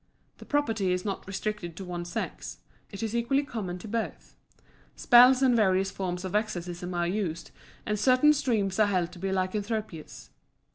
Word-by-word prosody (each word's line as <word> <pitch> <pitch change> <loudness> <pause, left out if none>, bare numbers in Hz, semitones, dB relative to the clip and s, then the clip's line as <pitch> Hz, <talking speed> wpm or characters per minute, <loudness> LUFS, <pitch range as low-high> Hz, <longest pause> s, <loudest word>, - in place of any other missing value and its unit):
The - - -11
property 225 -10 0
is 180 +1 -1
not 195 -2 -4
restricted 195 -3 -4
to 195 - -6
one 175 -1 -5
sex; 175 - -5 0.3
it 200 +2 -7
is 225 +1 -2
equally 270 +4 +1
common 210 -10 -5
to 180 - -10
both. 225 +1 -4 0.6
Spells 250 +2 +6
and 255 -2 +4
various 195 -3 +2
forms 180 -1 -4
of 185 - -5
exorcism 180 -4 -3
are 175 0 +1
used, 175 -3 -3 0.3
and 210 -1 -1
certain 255 +6 +5
streams 220 -9 0
are 215 - +5
held 180 -4 0
to 180 - -12
be 195 - -3
lycanthropous. 200 -2 -3
200 Hz, 165 wpm, -28 LUFS, 180-225 Hz, 0.6 s, Spells